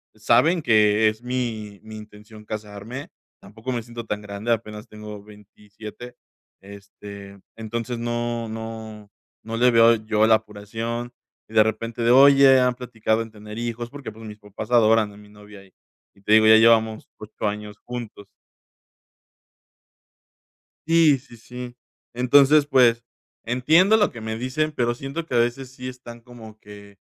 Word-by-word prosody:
Saben 125 Hz, -, +2 dB
que 110 Hz, -1 st, +4 dB
es 110 Hz, +2 st, -8 dB
mi 115 Hz, -5 st, -4 dB
mi 110 Hz, 0 st, -11 dB
intención 105 Hz, 0 st, -14 dB
casarme. 105 Hz, +5 st, -8 dB, 0.3 s
Tampoco 110 Hz, +6 st, -8 dB
me 120 Hz, -2 st, -2 dB
siento 115 Hz, 0 st, -9 dB
tan 105 Hz, -1 st, -4 dB
grande. 105 Hz, +3 st, -5 dB
Apenas 105 Hz, 0 st, -3 dB
tengo 105 Hz, -1 st, -10 dB
27. 105 Hz, +3 st, -13 dB, 0.5 s
Este, 100 Hz, 0 st, -12 dB, 0.2 s
entonces 115 Hz, +2 st, -5 dB
no 120 Hz, 0 st, -3 dB
no 110 Hz, -2 st, -8 dB, 0.3 s
no 115 Hz, 0 st, -5 dB
le 125 Hz, +1 st, +4 dB
veo 115 Hz, 0 st, +6 dB
yo 110 Hz, 0 st, +1 dB
la 110 Hz, -, +6 dB
apuración 115 Hz, +3 st, -5 dB, 0.4 s
y -, -, -15 dB
de 110 Hz, -, +7 dB
repente 115 Hz, +2 st, -4 dB
de: 115 Hz, -, +3 dB
"Oye, 135 Hz, 0 st, +7 dB
¿han 125 Hz, -1 st, +1 dB
platicado 115 Hz, -3 st, -2 dB
en 110 Hz, -, -13 dB
tener 105 Hz, 0 st, -11 dB
hijos?". 120 Hz, 0 st, -4 dB
Porque, 140 Hz, -5 st, -9 dB
pues, 110 Hz, +1 st, -13 dB
mis 105 Hz, -1 st, -9 dB
papás 105 Hz, +1 st, -9 dB
adoran 110 Hz, -2 st, +4 dB
a -, -, -16 dB
mi 105 Hz, 0 st, -16 dB
novia 105 Hz, -1 st, -15 dB
y 95 Hz, -, -25 dB, 0.4 s
y 100 Hz, -, -25 dB
te 105 Hz, +2 st, +1 dB
digo, 110 Hz, 0 st, +6 dB
ya 110 Hz, 0 st, +8 dB
llevamos 110 Hz, -1 st, +3 dB
8 105 Hz, 0 st, -6 dB
años 105 Hz, 0 st, -6 dB
juntos. 115 Hz, -5 st, -9 dB, 2.6 s
Sí, 165 Hz, -3 st, +4 dB
sí, 120 Hz, -3 st, -17 dB
sí. 125 Hz, +1 st, -9 dB, 0.4 s
Entonces, 140 Hz, +4 st, +4 dB
pues, 120 Hz, -4 st, +3 dB, 0.4 s
entiendo 160 Hz, -, +3 dB
lo 205 Hz, -, +1 dB
que 115 Hz, -, -10 dB
me 110 Hz, 0 st, -5 dB
dicen, 130 Hz, +6 st, -2 dB
pero 120 Hz, -4 st, -1 dB
siento 135 Hz, +6 st, -6 dB
que 130 Hz, -, -7 dB
a -, -, +3 dB
veces, 120 Hz, +2 st, -1 dB
sí 125 Hz, -1 st, -7 dB
están 120 Hz, -2 st, -11 dB
como 115 Hz, -3 st, -14 dB
que, 100 Hz, -1 st, -14 dB
115 Hz, 155 wpm, -23 LUFS, 105-125 Hz, 2.6 s, ya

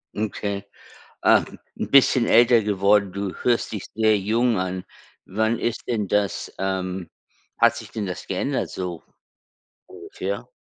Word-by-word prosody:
Okay. 100 Hz, -1 st, -3 dB, 0.6 s
Ah, -, -, +6 dB, 0.3 s
'n -, -, -4 dB
bisschen 130 Hz, -3 st, +5 dB
älter 120 Hz, -1 st, +6 dB
geworden. 100 Hz, -1 st, +2 dB
Du 100 Hz, 0 st, -4 dB
hörst 120 Hz, -1 st, +1 dB
dich 105 Hz, -4 st, -5 dB
sehr 110 Hz, -1 st, +4 dB
jung 110 Hz, +2 st, +1 dB
an. 90 Hz, 0 st, -3 dB, 0.4 s
Wann 110 Hz, +4 st, 0 dB
ist 120 Hz, -1 st, -3 dB
denn 110 Hz, -4 st, -1 dB
das, 105 Hz, 0 st, -1 dB
ähm 95 Hz, -2 st, -3 dB, 0.5 s
hat -, -, +4 dB
sich -, -, -9 dB
denn 110 Hz, -2 st, -3 dB
das 90 Hz, -1 st, -6 dB
geändert -, -, -1 dB
so 90 Hz, -3 st, -5 dB, 0.8 s
ungefähr? 400 Hz, +5 st, -6 dB
105 Hz, 135 wpm, -23 LUFS, 95-115 Hz, 0.8 s, Ah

